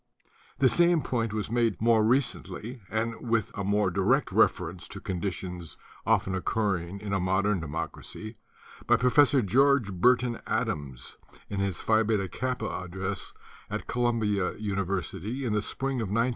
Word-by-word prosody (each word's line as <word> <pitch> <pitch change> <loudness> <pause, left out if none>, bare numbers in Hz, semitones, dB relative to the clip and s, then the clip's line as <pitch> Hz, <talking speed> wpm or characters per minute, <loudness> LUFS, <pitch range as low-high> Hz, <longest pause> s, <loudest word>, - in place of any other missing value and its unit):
The 135 - +5
same 170 +1 +4
point 115 -3 -1
was 105 0 -3 0.3
more 115 -1 +4
recently 125 0 -1
made, 110 - 0
and 115 0 -3
with 115 -3 +1
a 100 - -3
more 100 -1 +2
direct - - +2
reference 85 +2 +1
to - - -8
conditions 90 -2 -4 0.3
often 95 - +2
occurring 95 -2 -1
in 105 -2 -4
a 100 - +2
modern 95 +2 +1
democracy, 85 +7 -5 0.5
by - - +5
Professor 130 +1 +4
George 130 +1 +3
Burton 120 +5 +3
Adams 75 - -3 0.3
in 100 - -2
his 100 -3 -1
Phi 110 0 +3
Beta 105 -3 +1
Kappa 125 +3 -3 0.2
address 95 +2 -4 0.4
at - - -4
Columbia 115 -5 0
University 100 +4 -3
in 115 - 0
the 105 - +2
spring 135 +4 -2
of 110 - -2
1917. 115 +5 +1
105 Hz, 145 wpm, -28 LUFS, 95-120 Hz, 0.5 s, The